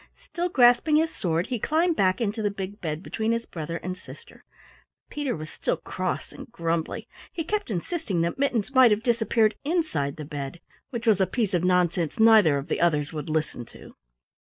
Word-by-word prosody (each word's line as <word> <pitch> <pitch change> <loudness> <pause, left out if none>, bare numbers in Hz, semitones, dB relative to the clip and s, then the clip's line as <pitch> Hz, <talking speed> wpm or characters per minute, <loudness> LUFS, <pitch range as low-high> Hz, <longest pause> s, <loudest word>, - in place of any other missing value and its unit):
Still 350 +1 -3
grasping 245 +1 +5
his 320 +1 +2
sword, 170 -1 -1
he 250 -3 -3
climbed 325 - +1
back 185 -5 +2
into 220 -1 -1
the 205 - +1
big 200 +1 -6
bed 160 0 -3
between 220 +1 -2
his 230 0 -2
brother 165 0 -5
and 185 +1 -5
sister. 185 - -14 0.7
Peter 290 -4 -2
was 155 -1 -8
still - - -2
cross 185 +2 -4
and - - -11
grumbly. 165 -5 -2 0.2
He 330 - -3
kept 410 0 -2
insisting 200 - -2
that 170 +9 -2
Mittens 255 -3 0
might 260 -2 +7
have 210 +1 +1
disappeared 225 -2 +2
inside 295 - -1
the 150 - -7
bed 140 +2 -6 0.3
which 235 -2 -5
was 210 -4 +4
a 190 - +3
piece 215 0 -1
of 175 -1 +1
nonsense 180 -2 +1
neither 215 -10 +6
of 140 - -5
the - - -1
others 150 -3 +1
would 150 -1 -5
listen 155 -5 -2
to. - - -14
200 Hz, 190 wpm, -26 LUFS, 165-245 Hz, 0.7 s, might